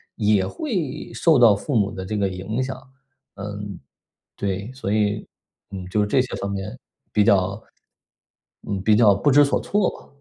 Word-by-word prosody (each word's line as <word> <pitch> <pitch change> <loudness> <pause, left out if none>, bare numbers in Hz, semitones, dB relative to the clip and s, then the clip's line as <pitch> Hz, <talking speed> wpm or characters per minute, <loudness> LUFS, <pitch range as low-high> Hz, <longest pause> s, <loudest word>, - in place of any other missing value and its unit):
也 105 -4 +2
会 170 - -4
受 165 -4 +4
到 115 -4 +7
父 135 +7 -3
母 100 -3 +2
的 95 -3 -6
这 105 - -3
个 100 -1 +1
影 95 +7 -3
响 130 0 -4 0.6
嗯， 100 -1 -6 0.6
对。 100 +4 -3
所 130 -7 -4
以， 105 -1 0 0.4
嗯， 95 -2 -6
就 105 - 0
是 105 - +1
这 130 +5 +3
些 125 - -5
方 100 - -4
面 100 +1 -5 0.3
比 105 - +3
较 100 +1 +2 1.1
嗯， 100 -2 -2
比 110 0 +4
较 105 -2 +6
不 100 - +1
知 145 +2 +7
所 140 - +1
措 205 -1 +1
吧。 - - -14
105 Hz, 190 characters per minute, -23 LUFS, 100-125 Hz, 1.1 s, 到